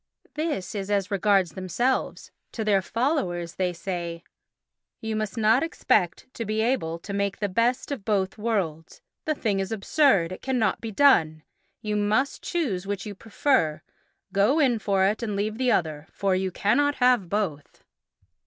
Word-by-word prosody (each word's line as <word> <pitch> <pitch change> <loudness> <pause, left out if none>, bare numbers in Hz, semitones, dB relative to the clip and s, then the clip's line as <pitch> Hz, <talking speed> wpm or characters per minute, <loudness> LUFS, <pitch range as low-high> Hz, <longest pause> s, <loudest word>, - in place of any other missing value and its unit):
This 300 - -3
is 200 -1 -4
as 200 -1 0
regards 195 -3 +2
themselves; 215 +9 -2 0.2
to 220 - -3
their 200 -2 +3
followers 185 - -1
they 185 -1 -1
say: 170 -1 -5 0.8
"You 220 0 -3
must 215 +1 -3
not 225 +3 +4
expect 200 - 0
to 230 - -4
be 215 0 -2
able 220 -9 0
to 200 +4 -8
make 200 0 -1
the 205 - -1
best 235 +8 0
of 260 -8 -4
both 195 -3 0
worlds. 185 -8 -2 0.2
The 310 -2 0
thing 210 -7 0
is 195 +1 -3
absurd; 215 - +2
it 185 - -7
cannot 245 -6 0
be 225 - -4
done. 165 - +4 0.4
You 210 -1 -1
must 210 +7 +1
choose 220 - -2
which 200 -1 -3
you 210 - -5
prefer, 215 - 0 0.5
go 205 +9 +3
in 250 -6 +3
for 195 -2 +2
it 210 +4 0
and 215 -3 -2
leave 215 +3 -2
the 255 -1 +2
other, 155 -5 -1
for 195 -1 0
you 190 0 0
cannot 285 +10 +1
have 250 -8 +3
both." 175 -8 -3
205 Hz, 165 wpm, -25 LUFS, 185-235 Hz, 0.8 s, not